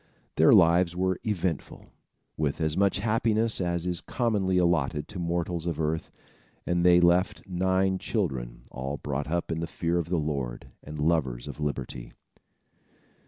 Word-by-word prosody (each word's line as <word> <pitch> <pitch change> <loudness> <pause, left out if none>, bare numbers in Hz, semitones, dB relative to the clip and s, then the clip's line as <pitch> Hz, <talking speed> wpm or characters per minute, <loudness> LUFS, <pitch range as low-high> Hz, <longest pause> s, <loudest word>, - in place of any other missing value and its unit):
Their 80 - +6
lives 85 -2 +5
were 95 0 0
eventful, 95 -7 -3 0.4
with 75 -2 -1
as 80 -1 0
much 100 0 +2
happiness 110 +1 +1
as 85 -1 -1
is 90 -2 -1
commonly 105 -6 0
allotted 85 -4 +1
to 90 - -7
mortals 85 0 -2
of 85 -3 -2
earth, 80 +1 -1 0.6
and 90 0 +1
they 90 0 +6
left 90 +2 +2
nine 95 +1 +1
children, 65 - -3
all 70 +3 -4
brought 70 0 -3
up 85 +2 -2
in 80 - -2
the 85 - -3
fear 85 +2 -1
of 85 -1 -4
the 90 - +1
Lord, 70 -6 -3
and 75 0 -8
lovers 75 -6 0
of - - -8
liberty. 70 -4 -4
85 Hz, 155 wpm, -27 LUFS, 75-95 Hz, 0.6 s, Their